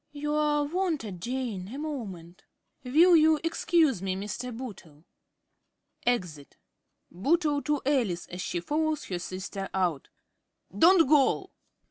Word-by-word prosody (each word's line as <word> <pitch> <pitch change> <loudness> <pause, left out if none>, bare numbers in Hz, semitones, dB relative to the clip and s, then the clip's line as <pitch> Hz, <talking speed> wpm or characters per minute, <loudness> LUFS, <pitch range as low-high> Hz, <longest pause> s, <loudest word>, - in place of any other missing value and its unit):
~ - - -47
You 295 0 -3
are 300 -1 +2
wanted, 300 - -2
Jane, 235 -5 -3
a 245 +7 -8
moment. 200 - -7 0.4
~Jane.~ 250 -1 -7
Will 345 +2 +7
you 315 -1 +5
excuse 325 - +2
me, 190 -1 -2
Mr. 210 +6 -5
Bootle? 195 - -9 1.0
(Exit.) 180 -12 -2 0.5
~Bootle~ 290 - +1
(to 300 -2 0
Alice, 235 -12 0
as 180 +1 -6
she 175 -2 -3
follows 310 - -1
her 180 -2 -4
sister 190 +2 -6
out). 175 -7 -1 0.7
Don't 335 - +6
go! 285 -2 +3
250 Hz, 130 wpm, -28 LUFS, 185-300 Hz, 1.0 s, Will